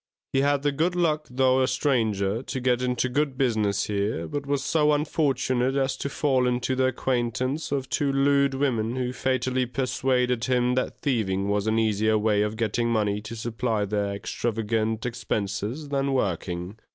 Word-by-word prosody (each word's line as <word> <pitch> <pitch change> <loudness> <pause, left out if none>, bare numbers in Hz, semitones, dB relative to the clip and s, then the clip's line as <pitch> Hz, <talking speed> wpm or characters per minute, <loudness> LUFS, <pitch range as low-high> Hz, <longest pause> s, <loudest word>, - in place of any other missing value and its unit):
He 135 - +3
had 140 0 +2
the 145 - +2
good 165 +6 0
luck, 155 -3 +1
though 130 +1 +3
a 130 - +3
stranger, 115 -6 0
to 130 - -4
get 125 -1 +1
into 125 0 0
good 135 +1 -1
business 110 -6 +1
here, 100 -5 -2
but 140 - -4
was 140 -1 0
so 150 -2 +3
unfortunate 135 -4 +1
as 135 -1 +1
to 140 - -3
fall 135 -3 +1
into 125 +1 0
the 130 0 +2
acquaintance 130 +3 -1
of 135 -2 -1
two 140 +1 0
lewd 140 0 +3
women, 120 -4 0
who 125 -1 -2
fatally 130 0 0
persuaded 125 -2 0
him 125 -1 +2
that 130 0 -2
thieving 100 -7 0
was 105 +1 0
an 110 +1 +2
easier 110 0 +2
way 105 -1 +2
of 105 +1 -1
getting 115 +1 0
money 105 -2 0
to 110 +2 -7
supply 115 -1 -1
their 100 0 -1
extravagant 110 +1 -2
expenses 115 +3 -3
than 140 -1 0
working. 90 -3 -2
125 Hz, 170 wpm, -25 LUFS, 110-135 Hz, -, He